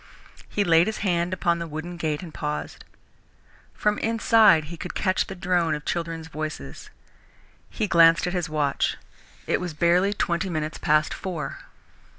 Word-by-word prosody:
He 205 - 0
laid 170 -1 +4
his 220 - -2
hand 175 -1 +1
upon 170 -2 0
the 170 - -4
wooden 160 +3 -6
gate 155 -1 -2
and 165 -3 -9
paused. 150 0 -5 0.9
From 210 0 0
inside 225 -6 +4
he 160 +3 -8
could - - -7
catch 185 -1 0
the 195 - -7
drone 175 -3 +1
of 150 - -8
children's 165 -1 -3
voices. 155 -1 -6 0.8
He 220 - -2
glanced 165 -1 +5
at 180 - -2
his 175 -3 -2
watch. 150 -3 0 0.5
It - - 0
was 175 -4 -5
barely 175 +4 +3
twenty 170 0 -1
minutes 155 -2 -3
past 155 -1 +2
four. 175 -5 -5
170 Hz, 160 wpm, -25 LUFS, 155-185 Hz, 0.9 s, glanced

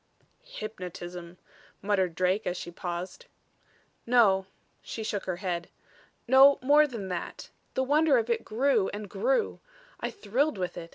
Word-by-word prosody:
"Hypnotism," 180 - -8 0.4
muttered 190 -4 0
Drake, 185 +4 +1
as 180 - -1
she 175 - -6
paused. 180 - -6 0.8
"No." 200 -6 +4 0.3
She 225 - -6
shook 205 -2 -3
her 185 - -2
head. 175 -2 -3 0.6
"No 270 +3 +7
more 295 +3 +6
than 225 -8 -6
that. 180 -2 -6 0.2
The 260 - +2
wonder 295 +1 +4
of 230 -1 0
it 235 - 0
grew 230 -2 +1
and 210 0 -6
grew. - - 0 0.4
I - - -2
thrilled 280 - -1
with 180 -1 -3
it. 165 -1 -8
210 Hz, 145 wpm, -28 LUFS, 180-265 Hz, 0.8 s, No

